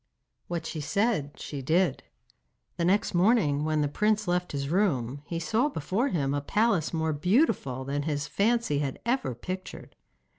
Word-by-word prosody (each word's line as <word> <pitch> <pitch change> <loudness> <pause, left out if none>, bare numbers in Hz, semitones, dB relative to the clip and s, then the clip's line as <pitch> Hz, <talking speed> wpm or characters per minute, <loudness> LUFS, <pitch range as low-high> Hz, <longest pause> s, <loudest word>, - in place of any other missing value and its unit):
What 170 -2 -3
she 155 - -4
said, 200 -3 0
she 140 -2 -5
did. 160 +2 +1 0.8
The 170 - 0
next 195 +3 +2
morning 175 -6 +3
when 155 -1 +1
the 145 - +2
prince 210 +7 +1
left 180 0 0
his 140 -1 -3
room 140 - 0
he 170 - -3
saw 225 - +1
before 195 - -1
him 140 - 0
a 145 - 0
palace 205 +1 +1
more 160 -1 0
beautiful 150 - +1
than 140 +1 -1
his 145 -1 -2
fancy 215 -5 +1
had 140 -2 -2
ever 240 - 0
pictured. 185 +9 -7
165 Hz, 160 wpm, -28 LUFS, 145-205 Hz, 0.8 s, morning